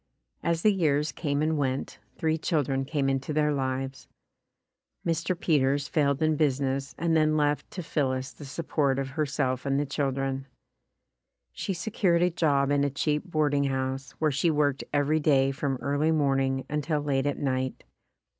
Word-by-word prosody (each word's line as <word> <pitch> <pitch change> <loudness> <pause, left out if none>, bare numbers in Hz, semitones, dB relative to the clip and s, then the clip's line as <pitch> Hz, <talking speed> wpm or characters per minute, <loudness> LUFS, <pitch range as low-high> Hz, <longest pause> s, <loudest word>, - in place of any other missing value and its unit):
As 170 -1 0
the 215 - +5
years 150 -5 +1
came 145 +1 -1
and 155 -1 +1
went, 135 -1 -2 0.2
three 160 -1 +1
children 140 -5 0
came 140 -1 -1
into 135 +2 -1
their 150 0 +2
lives. 135 -1 -3 1.0
Mr. 170 +1 -1
Peters 140 -2 +2
failed 145 -1 +1
in 155 0 +3
business 140 -1 0
and 165 0 +1
then 155 -1 +3
left 145 -1 0
to 180 - -6
Phillis 130 -4 -1
the - - -12
sup 140 +4 -6
port 140 -4 +2
of 135 -1 -2
herself 135 -3 -1
and 140 0 +1
the 145 - 0
children. 135 -1 -2 1.1
She 195 - -3
secured 175 -1 +1
a 180 - +3
job 145 -4 +2
in 145 0 +3
a 140 - +2
cheap 150 +2 -1
boarding 145 -3 +2
house, 130 0 -2
where 155 -1 0
she 145 +5 +1
worked 145 -3 +1
every 145 +2 +2
day 135 -3 +3
from 135 0 -2
early 145 +3 +1
morning 135 -3 +1
until 150 +1 -1
late 140 -1 0
at 145 - -1
night. 130 -2 -2
145 Hz, 165 wpm, -27 LUFS, 135-155 Hz, 1.1 s, the